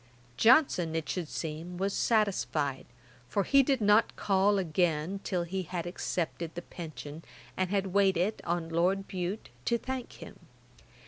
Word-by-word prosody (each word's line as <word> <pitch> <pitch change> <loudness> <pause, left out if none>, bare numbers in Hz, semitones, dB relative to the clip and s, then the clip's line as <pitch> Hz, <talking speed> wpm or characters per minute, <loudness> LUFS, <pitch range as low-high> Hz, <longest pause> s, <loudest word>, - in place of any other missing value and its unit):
Johnson, 205 - +4
it 160 -2 -2
should 180 -4 -2
seem, 165 +3 -5
was 195 +2 -1
satisfied, 185 - 0 0.4
for 200 - +1
he 275 +7 +5
did 270 -2 +1
not 210 +2 +4
call 200 +1 +2
again 175 0 0
till 180 -3 -1
he 190 +3 -3
had 175 -1 -4
accepted 170 -2 -3
the 175 - -5
pension, 155 -2 -8 0.3
and 185 -1 0
had 195 -2 -1
waited 195 +1 +2
on 170 -1 -2
Lord 185 +4 +1
Bute 185 +3 -4 0.2
to 235 - +2
thank 260 +1 -5
him. - - -11
185 Hz, 145 wpm, -30 LUFS, 165-200 Hz, 0.4 s, he